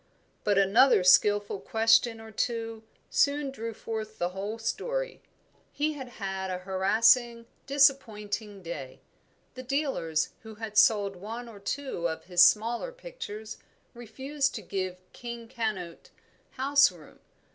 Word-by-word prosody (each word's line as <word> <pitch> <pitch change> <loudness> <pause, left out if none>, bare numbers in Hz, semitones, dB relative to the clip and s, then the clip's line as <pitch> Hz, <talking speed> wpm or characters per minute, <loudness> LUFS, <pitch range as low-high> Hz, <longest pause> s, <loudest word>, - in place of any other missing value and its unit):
But 205 -1 +2
another 200 +2 +5
skilful 205 +2 +4
question 225 +1 +3
or 220 0 -11
two 225 0 -3 0.3
soon 285 -1 +2
drew 230 -3 -5
forth 220 -1 -6
the 175 - -1
whole 200 +4 -5
story. - - -3 0.5
He 305 +1 -1
had 265 -4 -8
had 190 -2 -4
a 185 - -2
harassing, 225 +6 +3 0.2
disappointing 215 -8 +1
day. 145 -6 -7 0.5
The 255 - -8
dealers 255 - -1
who 220 -1 -11
had 215 -1 -7
sold 205 -2 +4
one 225 +6 -7
or 220 -3 -11
two 200 -4 -3
of 160 - -6
his 180 0 +5
smaller 230 - +3
pictures 485 - -8 0.4
refused 270 +5 -3
to - - -6
give 185 -2 -3 0.2
"King 235 -1 -8
Canute" 215 -8 -4 0.4
house 280 +1 +4
room. - - -16
225 Hz, 130 wpm, -28 LUFS, 195-255 Hz, 0.5 s, another